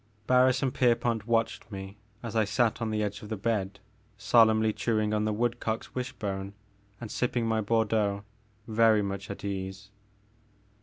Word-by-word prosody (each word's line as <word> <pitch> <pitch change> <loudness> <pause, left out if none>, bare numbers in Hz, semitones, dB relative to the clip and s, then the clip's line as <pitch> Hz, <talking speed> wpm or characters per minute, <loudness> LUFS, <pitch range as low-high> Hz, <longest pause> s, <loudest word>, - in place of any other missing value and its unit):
Barris 130 +1 +4
and 130 - 0
Pierpont 120 -3 +1
watched 115 -1 0
me 95 0 -7 0.3
as 115 -1 -5
I 110 - +4
sat 115 +3 +1
on 115 - -1
the 105 0 0
edge 105 0 -4
of 105 - -10
the 110 - -3
bed, 100 -2 -2 0.4
solemnly 110 -1 +4
chewing 110 -2 0
on 105 0 +1
the 110 - +1
wood 120 +3 -1
cock's 110 0 -3
wishbone 100 -6 -4 0.4
and 115 -3 -7
sipping 120 -1 0
my 110 -1 +1
Bordeaux, 105 -2 +1 0.4
very 110 -1 +4
much 100 0 -5
at 100 - -7
my 100 - -2
ease. 95 +1 -6
110 Hz, 165 wpm, -28 LUFS, 100-115 Hz, 0.4 s, Barris